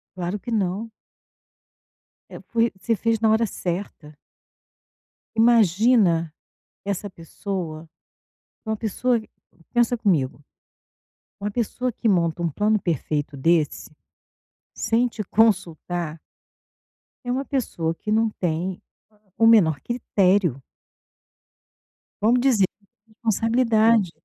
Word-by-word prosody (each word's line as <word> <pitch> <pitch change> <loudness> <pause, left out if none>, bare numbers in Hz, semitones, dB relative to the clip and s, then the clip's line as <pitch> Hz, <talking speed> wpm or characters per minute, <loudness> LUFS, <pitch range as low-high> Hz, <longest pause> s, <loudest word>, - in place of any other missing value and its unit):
Claro 180 +2 -3
que 240 - -7
não. 210 +1 -1 1.4
É - - -12 0.2
e 230 0 +3
você 225 +4 0
fez 225 +2 0
na 220 0 +3
hora 220 +1 +3
certa. 175 -5 -5 1.2
Imagina, 215 -6 +4 0.5
essa 200 0 -3
pessoa 165 -2 -6 0.8
uma 220 0 -1
pessoa 235 +3 0
q 220 - -11 0.4
pensa 240 0 +2
comigo, 150 - 0 1.0
uma 205 +1 -3
pessoa 245 +2 -2
que 230 - -3
monta 170 -2 +1
um 170 - 0
plano 210 +7 +1
perfeito 150 -4 -2
desse, 160 +1 +1 0.8
sem 235 +2 +1
te 225 -3 -5
consultar 175 -6 0 1.1
é 245 - -2
uma 265 +2 -1
pessoa 170 - -2
que 210 - -5
não 220 +1 +3
tem 175 +1 -2 0.6
o 225 - +5
menor 175 -11 +5
critério. 190 - +1 1.6
Vamos 235 +4 +3
dizer, 240 -7 +4
sem 200 -2 -33 0.3
responsabilidade. 225 -2 +2
205 Hz, 105 wpm, -23 LUFS, 170-230 Hz, 1.6 s, o